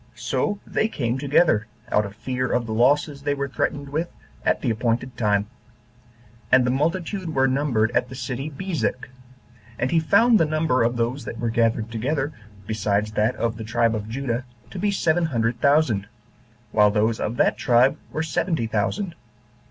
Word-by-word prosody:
So 205 -1 -1
they 215 - 0
came 125 - -2
together, 140 -6 +3 0.2
out 105 -1 +2
of 100 - -12
fear 125 +2 -2
of 120 -1 +1
the 110 - -4
losses 140 +5 +2
they 145 0 0
were 140 0 -2
threatened 140 +1 -2
with, 160 +4 -2 0.3
at - - +1
the 125 - +1
appointed 120 +2 -1
time. 105 -3 +1 1.1
And 130 -1 +6
the 125 - +2
multitude 165 +4 -1
were 135 0 +4
numbered 130 -5 +1
at 125 - +1
the 130 - -8
city 130 +3 -4
Bezek. 160 -3 -3 0.7
And 130 - -1
he 165 - +4
found 230 +8 +4
the 165 - +4
number 155 -4 +1
of 120 +1 +1
those 120 +3 -1
that 115 - -6
were 115 0 -1
gathered 115 -1 +1
together, 140 +6 -1 0.3
besides 105 0 0
that 105 +4 +1
of 115 -1 -2
the 110 - -6
tribe 115 +1 +1
of 105 -1 -4
Judah, 125 0 -2 0.3
to 190 - -6
be 205 +3 +1
seven 175 -3 +1
hundred 115 -5 -1
thousand, 140 -9 +3 0.6
while 105 -1 +5
those 110 +2 +1
of 115 +3 -2
that - - +2
tribe 125 +3 +4 0.2
were 155 - -2
seventy 160 -3 -1
thousand. 115 - -1
125 Hz, 175 wpm, -23 LUFS, 115-150 Hz, 1.1 s, And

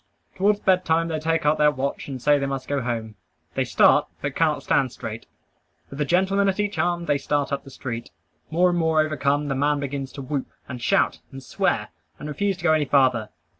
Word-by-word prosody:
Towards 205 +2 +2
bed 185 -2 +2
time 165 0 +1
they 160 -1 -2
take 165 0 0
out 150 +1 +3
their 150 0 +6
watch 140 -1 -3
and 135 -2 -5
say 145 +3 +3
they 140 - -1
must 135 -1 -4
go 140 -1 -1
home. 115 -3 -3 0.4
They - - 0
start, - - +4
but - - -3
cannot - - +1
stand - - +1
straight. - - -7 0.6
With 140 +2 -5
a - - +2
gentleman 190 +5 +2
at 195 - -2
each 205 0 -1
arm, 175 -1 0
they 145 -4 +1
start 145 0 -1
up 140 - -2
the - - -12
street. 120 -3 -6 0.4
More 180 +3 +3
and 175 - 0
more 160 -1 +3
overcome, 145 -1 0
the 140 - 0
man 145 +2 +1
begins 140 -1 -4
to 140 - -7
whoop, 135 0 -3 0.2
and 125 -1 -7
shout, - - +2
and 135 0 -9
swear, - - -1 0.3
and 150 - -7
refuse 195 +5 -1
to - - -12
go 160 -2 +4
any 155 -2 +2
farther. 130 -6 +2
145 Hz, 220 wpm, -24 LUFS, 135-165 Hz, 0.6 s, their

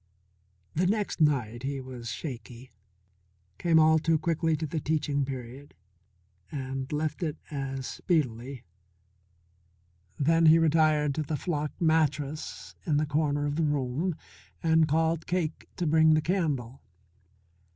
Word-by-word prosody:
The 180 +3 +1
next 205 -3 -1
night 120 -7 +2
he 135 +1 -3
was 125 -3 -7
shaky, 125 -1 -7 0.9
came 170 -2 +3
all 160 0 +5
too 165 +1 +2
quickly 160 0 0
to 160 - -3
the 155 +1 -3
teaching 145 -2 0
period, 130 +1 -8 0.8
and 135 -1 -4
left 150 +2 -2
it 160 -2 -2
as 135 -2 -4
speedily. 130 -7 -2 1.5
Then 165 +3 +4
he 160 +1 +8
retired 155 -2 +3
to 155 - -2
the 150 0 -2
flock 150 -2 -2
mattress 155 -2 0
in 150 -4 +1
the 155 - +2
corner 145 -1 0
of 145 +1 -2
the 165 - +2
room 145 +4 0 0.5
and 160 -1 +4
called 160 +1 +1
Cake 175 -3 -2
to 175 - -2
bring 160 0 +5
the 155 - +2
candle. 145 -8 -1
150 Hz, 130 wpm, -28 LUFS, 135-160 Hz, 1.5 s, he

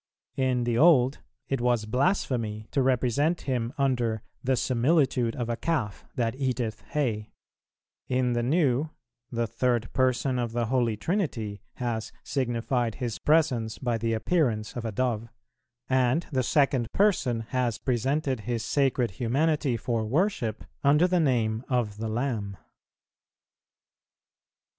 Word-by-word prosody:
In 130 -2 +1
the 120 -1 0
Old, 140 -5 +5 0.3
it 135 -3 -1
was 120 -3 +1
blasphemy 115 - 0
to 140 - +2
represent 130 +5 +1
Him 125 -3 -1
under 120 -6 0 0.2
"the 130 +1 +2
similitude 130 -1 +2
of 120 -2 -3
a 120 - -1
calf 125 -8 -2
that 115 -2 0
eateth 125 -4 -2
hay;" 115 -8 -1 0.8
in 125 -1 +1
the 120 - +1
New, 140 +1 +2 0.4
the 120 -1 0
Third 115 0 -1
Person 130 0 +1
of 120 -2 -2
the 120 0 0
Holy 120 -2 +1
Trinity 110 - -2
has 120 -3 -3
signified 120 -2 -1
His 120 -5 -4
Presence 130 -8 +2
by 120 -3 -1
the 115 0 0
appearance 110 -3 0
of 120 -1 -4
a 115 - -2
Dove, 115 0 -1 0.6
and 130 +5 +2
the 130 -3 +1
Second 135 -2 +2
Person 155 - +2
has 125 -4 0
presented 135 +2 0
His 115 +1 -3
sacred 130 -5 +1
Humanity 135 - +1
for 115 -1 -1
worship 125 - 0 0.2
under 150 +5 +5
the 180 -1 +2
name 115 -6 +1
of 120 -5 0
the 110 +1 -3
Lamb. 110 -5 -2
8. - - -35
125 Hz, 135 wpm, -27 LUFS, 115-135 Hz, 0.8 s, Old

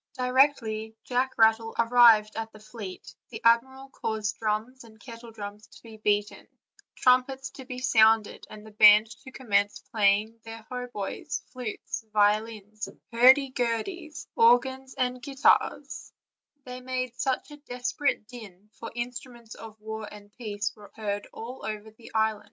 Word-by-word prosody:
Directly 250 -4 +1
Jacis 255 +1 -1
Rattle 225 0 +3
arrived 230 -2 +5
at 225 0 -5
the 215 - -15
fleet 215 -3 -9 0.2
the 220 - -8
admiral 265 +4 +2
caused 220 -5 -3
drums 225 +4 -2
and 220 -1 -17
kettledrums 220 -4 -10
to - - -17
be 225 -2 -12
beaten, 210 -1 -1 0.5
trumpets 265 +1 +2
to 265 - -11
be 250 0 -7
sounded, 220 -3 +3
and 215 0 -11
the 220 - -12
band 210 +1 +7
to 265 - -11
commence 205 -6 0
playing 215 +1 +2
their 225 -1 -10
hautboys, 245 -5 -5
flutes, 245 -1 -5
violins, 215 0 0 0.2
hurdy 260 +3 +6
gurdies, 300 - -3
organs, 260 +3 +3
and 250 -1 -1
gui 275 +2 -8
tars; 270 - +1 0.5
they 250 -1 -8
made 255 -1 -3 0.4
a 295 - -10
desperate 250 0 -1
din, 210 -4 -13
for 230 - -7
instruments 240 -1 -7
of 220 -1 -12
war 220 0 -7
and 205 -1 -14
peace 210 -3 -4
were 210 -2 -15
heard 205 -2 -4
all 245 +4 -9
over 215 0 -6
the 220 +2 -15
isle. 220 -1 +1
225 Hz, 140 wpm, -27 LUFS, 215-250 Hz, 0.5 s, band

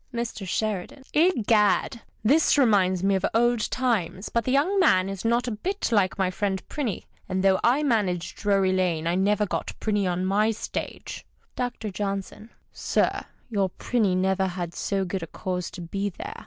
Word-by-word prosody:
Mr. 235 -5 -4
Sheridan. 215 +6 -3
— - - -27
Egad! 230 - +3 0.2
This 290 +7 +4
reminds 190 -8 +3
me 195 0 +3
of 190 0 0
old 240 0 +2
times, 215 -7 -1
but 235 -2 0
the 255 - 0
young 325 +9 +2
man 185 - +4
is 195 -1 -5
not 235 +2 +1
a - - -1
bit 360 - -3
like 200 -4 +2
my 190 -2 +1
friend 190 -1 -2
Prinny. 250 - -3 0.3
And 185 0 -1
though 190 -1 +4
/ - - -33 0.2
managed 185 -9 0
Drury 195 -2 +2
Lane, 175 -4 0
I 170 - +1
never 205 +3 +2
got - - -4
Prinny 205 -3 0
on 180 +1 -1
my 205 +3 +2
stage. 220 - -5 0.3
Dr. 245 -4 -3
J. 195 +1 -1 0.3
— - - -35
Sir, - - 0 0.3
your 200 -3 +1
Prinny 205 -2 0
never 190 +1 +1
had 175 -2 -4
so 195 +1 -1
good 185 +1 -3
a 165 - -5
cause 180 +2 -4
to 180 - -9
be 195 +4 -3
there. 415 - -8
200 Hz, 180 wpm, -25 LUFS, 185-235 Hz, 0.3 s, This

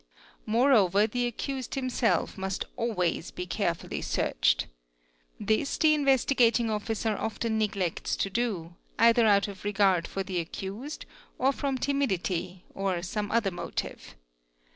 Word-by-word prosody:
Moreover 215 -4 +4
the 245 +2 -1
accused 260 +2 -4
himself 245 -8 0
must 190 0 -3
always 180 -9 -1
be 180 - -6
carefully 175 -2 -2
searched - - +1 0.7
This 220 +6 0
the 310 -1 +5
Investigating 260 -5 +3
Officer 215 +1 -1
often 220 +1 -2
neglects 195 -5 -1
to 195 - -2
do, 195 -7 -2 0.2
either 230 0 +5
out 200 -1 +4
of 200 -2 -9
regar 195 -4 +2
for 195 - -3
the 185 -2 -2
accused, 200 - -6 0.3
or 265 +2 +3
from 275 -1 -2
timidity, 190 -10 -1
or 190 -3 -1
some 205 +3 -3
other 225 -4 +2
inotive. 175 - -6
215 Hz, 125 wpm, -28 LUFS, 190-240 Hz, 0.7 s, the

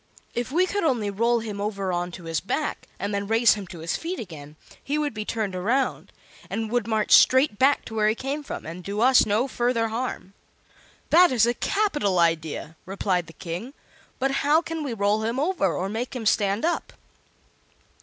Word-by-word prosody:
If 240 +1 -3
we 355 +5 +3
could 405 +1 -2
only 235 -10 +1
roll 230 +3 +1
him 210 -3 -5
over 200 -3 -2
on 175 0 -1
to 175 - -9
his 165 -1 -2
back, 295 +10 -3
and 200 +1 -3
then 200 0 -2
raise 225 +1 +5
him 205 -3 -6
to 170 -2 -10
his 165 - -2
feet 350 +3 -4
again, 150 -7 -9 0.3
he 290 +2 -1
would 295 -4 -1
be 215 -1 -5
turned 210 -5 -2
around, 235 +9 -1 0.4
and 220 -1 -3
would 240 -3 0
march 220 -2 0
straight 260 -4 +6
back 275 +2 +3
to 225 - -9
where 215 -1 +3
he 215 - +1
came 275 +5 -3
from, 290 - -7
and 170 +3 -7
do 200 +3 -4
us 255 -1 +5
no 215 +6 +1
further 240 -3 0
harm." 225 -4 -4 0.8
"That 350 +2 +7
is 235 -3 +4
a 240 - +1
capital 295 - 0
idea," 165 -2 0
replied 185 -3 -1
the 165 - -12
King. 180 - -6 0.4
"But 270 +1 0
how 295 +3 +4
can 330 -2 -5
we 260 -5 -3
roll 205 +1 +1
him 230 +4 -1
over, 300 - +1
or 185 +3 -2
make 230 +6 -4
him 235 -3 -4
stand 205 +3 +2
up?" 345 - -2
220 Hz, 200 wpm, -25 LUFS, 195-265 Hz, 0.8 s, That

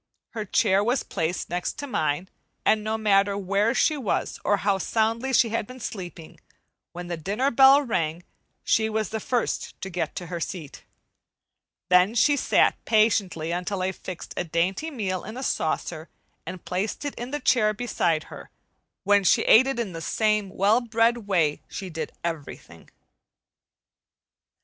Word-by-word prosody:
Her 215 -2 -5
chair 200 -1 +2
was 245 +4 +1
placed 165 +2 -3
next 175 0 -2
to 290 - -6
mine, 155 - -1 0.4
and 215 -1 +3
no 220 +1 -1
matter 200 -2 +2
where 200 +4 +1
she 305 +4 +2
was 250 -8 -2
or 205 - +2
how 200 -1 0
soundly 225 +6 0
she 240 -2 +4
had 220 -1 -2
been 255 0 -11
sleeping, 180 -7 -8 0.5
when 175 0 -7
the 175 -1 -4
dinner 210 - -1
bell 270 +3 +7
rang 170 - -2 0.4
she 220 0 +2
was 220 0 -1
the 220 - -3
first 240 +2 -2
to 190 - -6
get 180 0 -3
to 175 - -5
her 170 0 -5
seat. 165 -3 -7 1.0
Then 180 +5 +4
she 290 +5 +4
sat - - +2
patiently 200 -7 +2
until 180 +2 -2
I 190 - 0
fixed 185 -1 -8
a - - -1
dainty 175 - -1
meal 195 - -3
in 215 +4 -8
a 260 - -5
saucer 160 -4 -2 0.4
and 180 0 -7
placed 195 +9 -3
it 285 - -3
in 240 +1 -6
the 295 +2 -3
chair 240 -5 +3
beside 175 -8 -1
her, - - -11 0.5
when 205 0 +4
she - - +4
ate 255 +4 +6
it 270 -3 -2
in 210 -6 -3
the 165 - -6
same 215 +2 0
well 205 +5 +2
bred 230 -1 +1
way 165 -7 +1
she 190 -2 -7
did 160 0 -5
everything. 165 -4 -7
205 Hz, 165 wpm, -25 LUFS, 180-230 Hz, 1.0 s, bell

